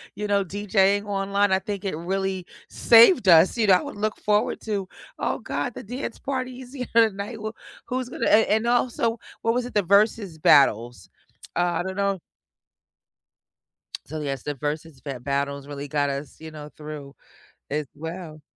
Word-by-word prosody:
you 210 +1 -3
know, 200 -1 +2
DJ-ing 205 +1 +1
online, 200 0 0
I 190 - +3
think 200 0 -5
it 190 -6 -3
really 190 +1 -2 0.2
saved 230 - +6
us, 170 +6 +6
you 220 -3 +2
know, 190 - +7
I 180 - +4
would - - -8
look 215 +1 -1
forward 210 0 +1
to, 200 -4 -3 0.3
"Oh - - -1
god, 245 - -3
the - - -8
dance 245 +3 -6
party 255 -2 -4
is 255 0 -12
here 255 -3 -4
tonight, 220 0 +2
who 215 0 -5 0.3
who's 255 0 -3
gonna" - - -2
And 220 +1 +5
And 220 +2 +1
also, 240 -1 +1 0.2
what 230 0 +1
was 245 0 -1
it? 250 - -8
The 205 -2 +2
versus 200 -2 +2
battles. 120 -5 +3 0.5
Uh, - - +3 0.2
I - - -4
don't 190 +1 -5
know 200 -2 0 1.9
So, 155 +2 -6
yes, 135 -3 -3
the 145 -1 -3
versus 150 +1 -5
bat 130 -4 -7
battles 140 0 -2
really 145 0 -7
got 145 -1 0
us, 140 +2 -5
you 160 - -8
know, 150 -1 -9
through, 150 -2 -8 0.6
as 150 0 -2
well. 160 0 -7
195 Hz, 180 wpm, -24 LUFS, 150-215 Hz, 1.9 s, know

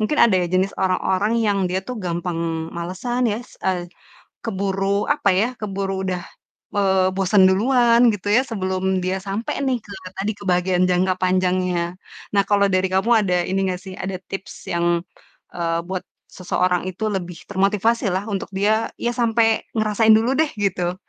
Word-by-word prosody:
mungkin 215 +8 0
ada 220 - +3
ya, 175 - 0
jenis 185 +2 +1
orang-orang 190 +3 +1
yang 200 -1 +2
dia 185 +1 -2
tuh 250 -1 -6
gampang 175 -1 -3 0.3
malesan 205 +9 -2
ya 210 - -1
s - - -19
eee, 185 -2 -1 0.6
keburu, 195 -1 -1
apa 290 -8 +2
ya, 195 +6 +2
keburu 195 -2 -3
udah, 180 -2 -2 0.5
eee, 190 -2 +2
bosen 195 +1 +4
duluan 235 +3 +4
gitu 205 0 -4
ya 235 +5 +5
sebelum 190 -3 -1
dia 185 +1 -1
sampai 195 +4 -4
nih, 260 -2 +2
ke 205 - -16 0.2
tadi 205 +3 -2
ke 205 - -11
bagian 180 0 +2
jangka 185 +1 +1
panjangnya. 180 -1 0 0.4
Nah, 200 - +5
kalo 200 -1 +3
dari 185 0 +2
kamu 190 +5 0 0.2
ada 180 -1 +2
ini 190 +2 -2 0.2
gak 180 - -7
sih, 190 -2 -9
ada 190 0 -4 0.2
tips 195 0 -6 0.2
yang, 170 0 0 0.7
eee, 165 -1 -1
buat 185 +1 -5 0.3
seseorang 180 -1 0
itu 215 +4 -4
lebih 180 -4 -5
termotivasi 205 +3 +1
lah 190 +2 -2
untuk 195 - -3
dia, 215 +3 +1
ya 240 - -1
sampe 225 -1 +2
ngerasain 220 0 +2
dulu 230 +5 +2
deh 315 -2 +2
gitu, 185 -4 -1
190 Hz, 170 wpm, -21 LUFS, 185-215 Hz, 0.7 s, ya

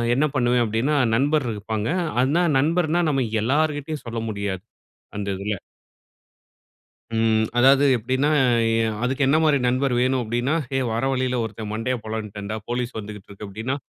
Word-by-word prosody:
என்ன 145 +4 +3
பண்ணுவேன் 120 -1 +3
அப்டீன்னா, 115 +7 0 0.2
நண்பர் 145 +2 +1
இருப்பாங்க. 105 +1 -3 0.3
அனா, 150 +7 +2 0.2
நண்பர்னா 165 +3 +2
நம்ம 135 -3 +1 0.2
எல்லார்கிட்டயும் 150 +3 -1
சொல்ல 115 -1 -3
முடியாது 100 -3 -3 0.5
அந்த 100 -1 -3
இதில. 100 +1 -2 1.6
ம். 110 -1 +2
அதாவது 135 +3 +6
எப்படின்னா, 130 +5 0 0.3
அ - - +2 0.5
அதுக்கு 130 +3 -1
என்ன 145 - +4
மாதிரி 150 -2 +4
நண்பர் 130 +1 +1
வேணும் 130 +1 +2
அப்டீன்னா, 120 +5 -1 0.2
"ஏய் 130 -1 0
வர 115 +3 -1
வழியில 130 -1 0
ஒருத்தன் 110 -1 -6
மண்டையைப் 115 +2 -2
பொளந்துட்டேண்டா, 110 -1 -5
போலீஸ் 120 0 -3
வந்துகிட்டு 105 -2 -8
இருக்கு." 100 +1 -9
அப்டீன்னா, 110 +7 -3
125 Hz, 140 wpm, -23 LUFS, 110-135 Hz, 1.6 s, அதாவது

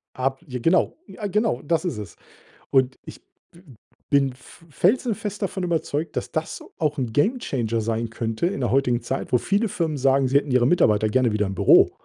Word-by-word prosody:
Ab, 135 +1 -1
j 130 -4 -5
genau, 165 +6 +2
ja 210 - -8
genau, 205 - 0
das 165 +4 0
ist 170 -10 -2
es 105 -5 -8 0.6
und 130 -1 +2
ich - - -11 0.3
w 170 - -17 0.5
bin 140 -2 +3
f 150 +6 -18
felsenfest 210 - 0
davon 195 -1 -2
überzeugt, 165 -2 -2
dass - - -3
das 160 0 -4 0.2
auch 150 -2 0
'n 125 -4 -2
Gamechanger 135 - 0
sein 115 +1 -2
könnte 115 +5 -2
in 175 -6 -3
der 120 - 0
heutigen 125 -2 +2
Zeit, 130 +3 -4
wo - - +7
viele 205 - +1
Firmen 160 -5 -2
sagen, 135 0 +3
sie 135 +2 +3
hätten 145 - -1
ihre 125 -1 +3
Mitarbeiter 110 -9 +3
gerne 125 0 +2
wieder 105 0 0
im 95 - -5
Büro. - - +6
135 Hz, 195 wpm, -23 LUFS, 120-170 Hz, 0.6 s, wo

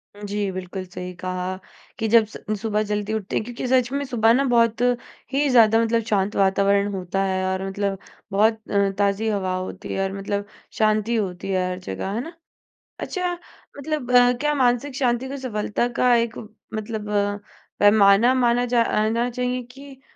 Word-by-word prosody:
जी, 205 -1 -3
बिल्कुल। 185 0 -6
सही 180 0 -7
कहा 185 0 -4 0.5
कि 220 - 0
जब 225 0 +5
स 215 - -11 0.2
सुबह 215 -1 0
जल्दी 210 +1 -1
उठते 215 -3 -3
हैं - - +1
क्योंकि 245 +1 -6
सच 250 -1 +2
में 280 +1 -1
सुबह 230 -3 +3
ना 275 +3 +3
बहुत 230 0 +3 0.5
ही 285 +2 +2
ज़्यादा 225 -3 +5
मतलब 230 0 +1
शांत 200 -1 +1
वातावरण 200 +1 +3
होता 190 +1 -2
है 190 -1 -1
और 190 0 -2
मतलब 195 0 -2 0.3
बहुत 220 +2 +2
अ, 200 -1 +2
ताज़ी 200 +2 +1
हवा 190 -3 -1
होती 185 0 -5
है, - - -2
और 195 0 -2
मतलब 200 +1 -3 0.3
शांति 215 +1 +2
होती 195 -4 -3
है 185 -1 +1
हर 180 - -4
जगह। 185 - -5
है 230 - -1
ना? 330 +5 -8 0.7
अच्छा 360 -2 -2 0.4
मतलब 285 -3 -3 0.3
क्या 295 0 +1
मानसिक 255 +1 +1
शांति 250 -2 0
को 280 - -5
सफलता 235 -2 -2
का 250 -1 +5
एक 230 -1 0 0.4
मतलब 215 0 -4 0.7
पैमाना 205 +3 +6
माना 245 -1 +2
जा 240 -1 +2
आना 230 +3 0
चाहिए 250 +1 -2
कि 275 0 -13
215 Hz, 170 wpm, -23 LUFS, 195-245 Hz, 0.7 s, पैमाना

